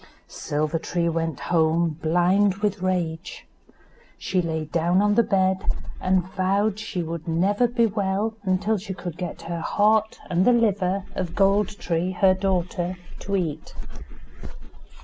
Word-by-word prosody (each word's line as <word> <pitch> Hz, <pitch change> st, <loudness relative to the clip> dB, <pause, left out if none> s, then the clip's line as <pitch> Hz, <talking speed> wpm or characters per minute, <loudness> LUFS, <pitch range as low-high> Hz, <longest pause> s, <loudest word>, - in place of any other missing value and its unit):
Silver 155 Hz, +2 st, -2 dB
tree 170 Hz, +1 st, -1 dB
went 165 Hz, -3 st, -2 dB
home, 165 Hz, 0 st, +2 dB
blind 180 Hz, +4 st, +3 dB
with 205 Hz, -1 st, -2 dB
rage. 175 Hz, -3 st, -2 dB, 0.7 s
She 185 Hz, -, 0 dB
lay 160 Hz, -2 st, -2 dB
down 170 Hz, +4 st, +1 dB
on 205 Hz, 0 st, +3 dB
the 235 Hz, -, +5 dB
bed, 190 Hz, -4 st, +1 dB, 0.4 s
and 185 Hz, -1 st, +2 dB
vowed 195 Hz, +3 st, 0 dB
she 180 Hz, -4 st, -3 dB
would 165 Hz, 0 st, -6 dB
never 195 Hz, +8 st, +2 dB
be 235 Hz, 0 st, +2 dB
well 205 Hz, 0 st, -1 dB
until 200 Hz, +2 st, 0 dB
she 190 Hz, 0 st, -6 dB
could 175 Hz, -3 st, -6 dB
get 180 Hz, -1 st, -5 dB
the 170 Hz, 0 st, -5 dB
heart 215 Hz, +3 st, +2 dB
and 175 Hz, +1 st, +1 dB
the 245 Hz, -, +5 dB
liver 200 Hz, -4 st, +1 dB
of 180 Hz, -3 st, -4 dB
Gold 200 Hz, +1 st, +2 dB
tree, 175 Hz, +2 st, -1 dB
her 185 Hz, +1 st, +4 dB
daughter, 185 Hz, -1 st, -1 dB, 0.2 s
to 200 Hz, -, -3 dB
eat. 170 Hz, -6 st, -3 dB
185 Hz, 145 wpm, -24 LUFS, 170-205 Hz, 0.7 s, the